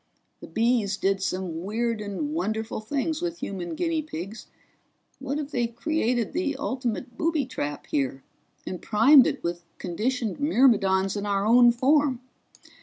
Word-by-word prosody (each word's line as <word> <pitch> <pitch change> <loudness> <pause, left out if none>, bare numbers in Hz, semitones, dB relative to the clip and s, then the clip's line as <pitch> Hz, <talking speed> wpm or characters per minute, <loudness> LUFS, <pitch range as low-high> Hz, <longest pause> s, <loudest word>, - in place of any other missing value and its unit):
The - - -10
Bees 225 -4 +1
did 195 0 0
some 180 -3 -3
weird 225 +2 -1
and 210 +9 -4
wonderful 220 -10 -2
things 285 +7 -2
with 345 -1 -3
human 180 - -5
guinea 330 -2 0
pigs 210 - -7 0.7
what 275 +1 -3
if 295 -1 -5
they've 235 -3 -1
created 250 -5 0
the 310 -4 -1
ultimate 250 -2 -3
booby 320 -4 +1
trap 145 - -5
here, 135 -1 -2 0.4
and 180 - -5
primed 265 +5 +6
it - - -3
with 170 0 -3
conditioned 230 +6 -2
myrmidons 210 - +3
in 205 0 -3
our 200 0 0
own 240 +2 +7
form? 270 +1 +2
235 Hz, 145 wpm, -26 LUFS, 195-280 Hz, 0.7 s, own